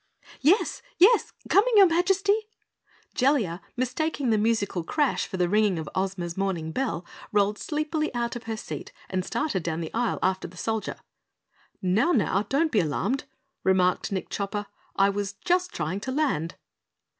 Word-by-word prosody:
"Yes? 345 +10 +3 0.2
Yes! 435 +7 +5 0.2
Coming, 445 +4 +4
your 395 - +10
Majesty!" 380 +4 +3 0.8
Jellia, 240 - +1 0.2
mistaking 260 +1 0
the 220 - +3
musical 205 -5 0
crash 290 - 0
for 190 - -5
the 180 -1 +2
ringing 210 -1 +2
of 160 -1 -4
Ozma's 185 -3 -2
morning 185 -5 -2
bell, 175 -7 -2 0.3
rolled 205 0 +2
sleepily 305 0 -1
out 235 0 -1
of 240 - -7
her 225 -1 -3
seat - - -7 0.2
and 185 -1 0
started 230 - -1
down 160 0 -2
the 160 -2 -5
aisle 235 +1 0
after 190 0 0
the 180 - -15
Soldier. 220 +3 -2 0.9
"Now, 210 - +3
now 200 -4 +2
don't 310 +3 +2
be 220 - +3
alarmed," 195 - -1 0.4
remarked 185 0 +2
Nick 190 -2 -3
Chopper. 205 +1 -3 0.3
"I 195 0 +4
was 200 -1 -3
just 360 - 0
trying 165 +5 -2
to 260 +6 -4
land." 260 - 0
210 Hz, 155 wpm, -26 LUFS, 185-290 Hz, 0.9 s, your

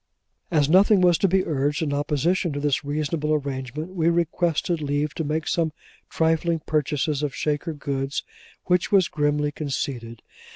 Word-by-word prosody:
As 150 -5 +2
nothing 195 +4 +5
was 175 -2 +4
to 195 - +3
be 190 +1 +2
urged 145 +2 0
in 145 -2 -1
opposition 150 +5 0
to 145 - -3
this 145 -3 0
reasonable 150 +1 -1
arrangement, 140 +3 -4
we 170 -2 +2
requested 170 0 0
leave 145 +1 -1
to 160 - -3
make 155 +1 -2
some 165 -2 +1 0.4
trifling 165 +1 +1
purchases 150 -1 0
of 145 -3 -2
Shaker 150 +2 -1
goods; 140 -1 -3 0.4
which 180 -1 +1
was 190 -4 +5
grimly 145 0 0
conceded. 130 -6 -4
150 Hz, 155 wpm, -24 LUFS, 145-170 Hz, 0.4 s, nothing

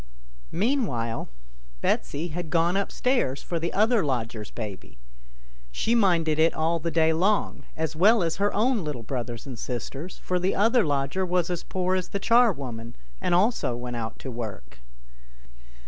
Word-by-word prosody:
Meanwhile 175 - 0 0.5
Betsy 145 - 0
had 165 0 -5
gone 170 +2 +2
upstairs 200 - 0
for 170 - -2
the 170 +1 -2
other 220 +1 +3
lodger's 115 -6 -2
baby. 100 - -7 0.7
She 220 - 0
minded 170 -8 +3
it 160 +1 +4
all 165 +2 +1
the 170 +2 -2
day 160 0 +3
long, 195 +6 +1
as 160 0 -2
well 205 +5 +5
as 165 -1 -1
her 205 +1 +2
own 225 0 +1
little 145 -6 -4
brothers 120 -1 -4
and 130 -4 -7
sisters, 135 - -5
for 180 0 -1
the 185 +2 +1
other 230 +4 +4
lodger 140 +4 0
was 180 -1 0
as 175 - -2
poor 185 0 -1
as 185 -2 -2
the 200 - -2
charwoman, 140 - +2 0.3
and 175 - +2
also 185 - +2
went 120 0 -5
out 115 -1 -4
to 130 - -7
work. 100 - -7
165 Hz, 160 wpm, -26 LUFS, 125-190 Hz, 0.7 s, well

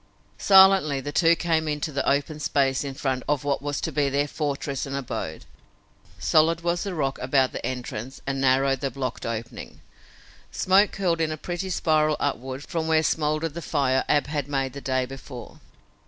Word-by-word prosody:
Silently 190 -7 +6
the 145 +2 -5
two 165 +1 +4
came 160 -2 0
into 150 +1 -2
the 140 -1 0
open 145 +2 0
space 135 -2 +1
in 135 -1 -5
front 130 -2 -1
of 145 -2 +1
what 140 -1 -1
was 145 0 -3
to - - -3
be 145 -2 +1
their 140 +2 0
fortress 140 -2 -3
and 135 - -4
abode. 120 -12 -5 0.7
Solid 165 +1 +3
was 175 0 0
the 195 -3 -4
rock 135 -4 -1
about 130 0 +2
the - - -6
entrance 125 0 -5
and 135 0 -2
narrow 135 +1 +3
the 135 +1 -3
blocked 130 -1 -4
opening. 115 +1 -6 0.7
Smoke 195 +2 +3
curled 175 -4 0
in 160 -1 0
a 155 - -4
pretty 175 +4 -4
spiral 155 -3 +2
upward 135 -1 -3
from 160 0 -3
where 160 0 +3
smoldered 155 0 0
the 170 - -6
fire 130 -3 +1
Ab 145 -1 +3
had 145 -2 -3
made 135 -2 -2
the 140 - -7
day 130 -1 0
before. 130 -1 -10
145 Hz, 185 wpm, -25 LUFS, 135-160 Hz, 0.7 s, Silently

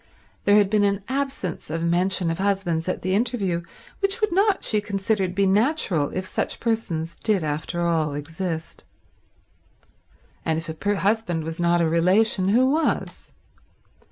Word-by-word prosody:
There 205 - +5
had 205 -2 +5
been 205 +1 +2
an 200 0 +1
absence 270 - -3
of 165 +1 -2
mention 175 +1 +1
of 165 - -4
husbands 190 -4 0
at - - -3
the 185 +1 0
interview 200 -5 0 0.4
which 395 +3 +1
would 430 -4 +1
not, 395 +2 +2
she 210 -2 +1
considered, 195 -2 -1
be 200 0 +3
natural 195 - +2
if 185 0 -4
such - - -3
persons 170 -8 -2
did 210 -6 0
after 155 +3 -2
all 160 -4 +1
exist. 160 +2 -5 1.6
And 160 -1 0
if 165 +1 -5
a 200 +6 -1
husband 195 -5 0
was 165 +1 -5
not 175 0 +3
a 165 - +3
relation, 185 +4 +2
who 235 +6 +4
was? 310 +4 -1
190 Hz, 155 wpm, -24 LUFS, 165-215 Hz, 1.6 s, There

